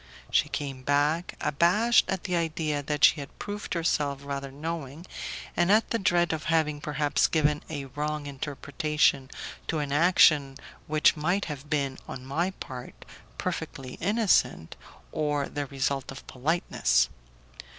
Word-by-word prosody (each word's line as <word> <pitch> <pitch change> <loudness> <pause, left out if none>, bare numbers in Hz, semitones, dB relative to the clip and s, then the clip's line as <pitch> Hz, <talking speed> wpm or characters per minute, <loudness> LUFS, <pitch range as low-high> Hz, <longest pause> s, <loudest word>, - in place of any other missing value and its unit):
She - - +3
came 135 -3 -4
back, 145 +5 +1
abashed 175 +11 +3
at 190 -2 -2
the 180 -2 -1
idea 160 -3 -1
that 150 +1 -3
she 160 - +7
had 140 - -9
proved 205 -2 -5
herself 145 -4 0
rather 140 -1 -4
knowing, 155 +1 -5 0.5
and 175 +2 +3
at 215 +2 +3
the 230 - +1
dread 175 -3 +2
of 155 -1 -4
having 155 -3 +1
perhaps 150 -1 +1
given 150 -2 +1
a 145 -3 -4
wrong 150 +2 -3
interpretation 140 0 0 0.4
to 165 - -1
an 145 -2 -2
action 150 -3 +5 0.3
which 155 0 +4
might 175 +6 0
have 150 -1 -7
been, 140 -3 -1
on 130 0 -7
my 160 +7 0
part, 130 -9 -8 0.4
perfectly 130 -1 -5
innocent, 205 - +2 0.4
or 150 -2 0
the 145 -1 -4
result 135 0 -2
of 135 - -10
politeness. 130 - +1
150 Hz, 140 wpm, -27 LUFS, 140-165 Hz, 0.5 s, she